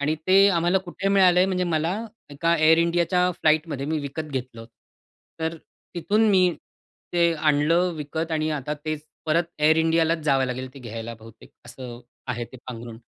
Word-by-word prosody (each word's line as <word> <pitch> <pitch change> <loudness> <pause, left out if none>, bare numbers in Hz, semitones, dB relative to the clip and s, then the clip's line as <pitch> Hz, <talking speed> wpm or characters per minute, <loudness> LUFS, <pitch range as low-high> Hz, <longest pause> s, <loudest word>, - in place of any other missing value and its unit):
आणि 150 +2 0
ते 195 +2 +6
आम्हाला 175 +3 +2
कुठे 190 +2 -4
मिळालं 185 -3 +5
आहे 185 - +4
म्हणजे 180 -1 -1
मला 165 0 0 0.4
एका, 165 +4 0
Air 160 +1 +5
Indiaच्या 175 +1 +1
फ्लाइटमध्ये 155 -3 +1
मी 155 0 -1
विकत 145 +2 -5
घेतलं 125 -3 -5
होत. 115 - -12 0.7
तर 160 +1 -2 0.4
तिथून 210 +6 +2
मी 185 -2 +4 0.7
ते 170 -1 +3
आणलं 155 +4 +2
विकत 160 +2 -4
आणि 155 0 0
आता 150 0 -3
तेच 155 -1 -3 0.2
परत 165 +2 +2 0.2
Air 155 +1 +5
Indiaच 165 0 +1
जावं 135 -3 +2
लागेल 130 +1 -4
ते - - -10
घ्यायला 115 -1 -7
बहुतेक 115 0 -15 0.2
असं 120 0 -9 0.3
आहे 120 -1 -3
ते 130 - -13
पांघरूण. 115 -2 -8
155 Hz, 170 wpm, -24 LUFS, 135-170 Hz, 0.7 s, ते